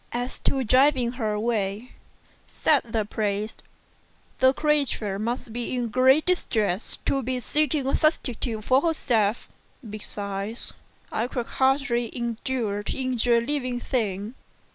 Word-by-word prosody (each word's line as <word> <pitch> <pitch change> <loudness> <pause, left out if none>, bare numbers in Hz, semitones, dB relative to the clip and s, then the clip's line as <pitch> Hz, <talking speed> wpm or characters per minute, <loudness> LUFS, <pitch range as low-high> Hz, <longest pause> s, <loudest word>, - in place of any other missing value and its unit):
"As 245 +1 -4
to 270 -1 +2
driving 255 0 +4
her 230 -4 -2
away," 210 +1 -1 0.6
said 295 -3 +2
the 225 -2 -1
priest, 210 0 -2 0.8
"the 260 0 +6
creature 275 -9 0
must 230 +1 -3
be 240 +1 -3
in 240 -2 -1
great 260 +6 +4
distress 220 - +1
to 275 - +1
be 255 0 -2
seeking 295 +2 +1
a 270 - 0
substitute 245 -7 0
for 260 +4 +4
herself; 240 -10 +1 0.4
2 225 - -10
besides, 205 +1 -3 0.4
I 225 +3 -1
could 245 -2 -3
hardly 265 -3 +1
endure 235 -3 -2
to 205 - -4
injure 245 -2 +2
a - - +2
living 255 -1 -2
thing." 215 -4 -2
240 Hz, 135 wpm, -25 LUFS, 215-265 Hz, 0.8 s, the